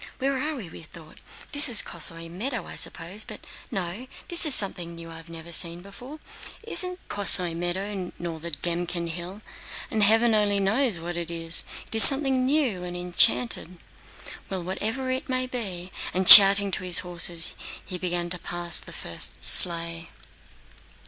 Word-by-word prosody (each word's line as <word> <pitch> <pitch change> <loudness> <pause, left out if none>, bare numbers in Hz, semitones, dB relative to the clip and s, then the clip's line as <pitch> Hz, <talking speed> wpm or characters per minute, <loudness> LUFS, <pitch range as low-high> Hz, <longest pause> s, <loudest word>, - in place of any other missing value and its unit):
"Where 275 +1 -4
are 305 +3 -5
we?" 190 - -12
thought 160 0 -17 0.3
he. 290 - -5
"It's 295 - +7
the 235 -5 +4
Kosóy 165 0 -3
meadow, 210 +5 -6
I - - -11
suppose. 185 +6 -7
But - - -10 0.3
no—this 230 - -4
is 285 - +3
something 175 -4 -1
new 165 0 -13
I've 165 0 -14
never 165 0 -11
seen 170 +1 -2
before. 245 +10 -14 0.5
This - - -9
isn't 365 0 -9
the - - -9
Kosóy 180 -4 +3
meadow 185 +2 -6
nor 170 -2 -8
the 170 +2 -8
Dëmkin 170 +2 -3
hill, 180 +5 -10 0.5
and 220 - -3
heaven 225 +3 +1
only 205 -1 -1
knows 215 0 -2
what 175 +1 -8
it 170 -1 -6
is! 165 0 +2 0.2
It - - -14
is 220 -2 +10
something 270 0 +8
new 260 -11 -3
and 175 0 -8
enchanted. 175 -1 -1 0.7
Well, 190 -2 -6
whatever 220 +8 -6
it 260 +1 -6
may 255 0 -3
be..." 190 -8 -9 0.2
And 185 0 -2
shouting 200 -1 +9
to 185 - -4
his 180 -1 +4
horses, 170 -1 -1 0.3
he 180 - -8
began 175 -1 -5
to 180 - -1
pass 175 0 -5
the - - -13
first - - -2
sleigh. 170 -2 +2
180 Hz, 170 wpm, -22 LUFS, 170-225 Hz, 0.7 s, is